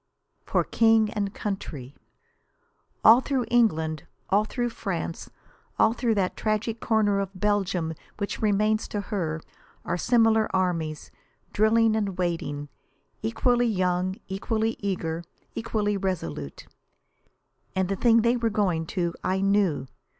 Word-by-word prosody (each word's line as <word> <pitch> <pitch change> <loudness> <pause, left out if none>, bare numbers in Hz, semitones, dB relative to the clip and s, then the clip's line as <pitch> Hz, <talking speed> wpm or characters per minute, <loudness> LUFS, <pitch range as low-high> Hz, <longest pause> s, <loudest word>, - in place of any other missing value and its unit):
For - - +1
King 225 -2 +3
and 200 -2 -2
Country! 160 -12 -5 1.1
All 230 +3 +8
through 265 -3 -1
England, 160 -10 +2 0.2
all 205 +2 +4
through 240 +1 -2
France, 175 -6 -4 0.5
all 225 - +4
through 235 -2 0
that 190 -2 0
tragic 220 +1 -1
corner 210 -3 +2
of 195 -1 -2
Belgium 190 -5 0 0.2
which 200 -1 -4
remains 215 +1 +2
to 205 - -3
her, 170 -6 -3 0.4
are 170 - -1
similar 225 +1 +3
armies, 165 -5 -1 0.4
drilling 220 +1 +4
and 200 -4 -1
waiting, 165 -5 -2 0.5
equally 245 - +2
young, 185 -2 0
equally 220 +4 -1
eager, 170 -4 -2 0.3
equally 210 -2 -1
resolute. 85 - -4 1.1
And 190 -1 +1
the 195 - -1
thing 230 +2 +4
they 235 +1 +3
were 230 -1 +1
going 185 -7 0
to 170 -1 -1
I 190 +1 0
knew. 195 -8 +2
200 Hz, 125 wpm, -26 LUFS, 175-220 Hz, 1.1 s, All